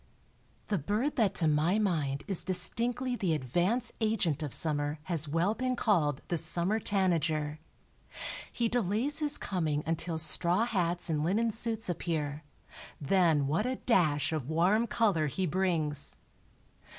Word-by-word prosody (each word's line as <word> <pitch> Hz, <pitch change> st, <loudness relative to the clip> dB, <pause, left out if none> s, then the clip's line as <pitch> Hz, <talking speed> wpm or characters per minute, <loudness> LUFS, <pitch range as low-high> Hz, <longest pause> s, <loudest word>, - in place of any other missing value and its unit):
The 205 Hz, -4 st, +1 dB
bird 215 Hz, -, -1 dB
that 210 Hz, -5 st, +2 dB
to 165 Hz, -, +2 dB
my 155 Hz, +6 st, +2 dB
mind 155 Hz, -10 st, 0 dB
is 195 Hz, -4 st, +2 dB
distinctly 235 Hz, +8 st, 0 dB
the 180 Hz, -8 st, 0 dB
advance 175 Hz, -, 0 dB
agent 195 Hz, -9 st, 0 dB
of 150 Hz, -3 st, -4 dB
summer 145 Hz, 0 st, 0 dB
has 160 Hz, -3 st, 0 dB
well 165 Hz, +7 st, +1 dB
been 255 Hz, +2 st, -1 dB
called 160 Hz, -, +1 dB
the 175 Hz, -, -1 dB
summer 170 Hz, +6 st, -1 dB
tanager. 160 Hz, -7 st, 0 dB, 0.9 s
He 235 Hz, -, 0 dB
delays 235 Hz, -, 0 dB
his 295 Hz, -1 st, +1 dB
coming 155 Hz, -6 st, -2 dB
until 165 Hz, +1 st, -2 dB
straw 175 Hz, +6 st, +3 dB
hats 175 Hz, -6 st, -1 dB
and 155 Hz, -3 st, -1 dB
linen 220 Hz, +7 st, +1 dB
suits 225 Hz, 0 st, -2 dB
appear; 155 Hz, -4 st, -2 dB, 0.6 s
then 160 Hz, -2 st, +2 dB
what 165 Hz, -, 0 dB
a 260 Hz, -, -1 dB
dash 160 Hz, -, +1 dB
of 150 Hz, -4 st, -3 dB
warm 185 Hz, +8 st, +2 dB
color 200 Hz, -11 st, +1 dB
he 185 Hz, +7 st, -2 dB
brings. 160 Hz, -5 st, +1 dB
175 Hz, 140 wpm, -30 LUFS, 155-215 Hz, 0.9 s, straw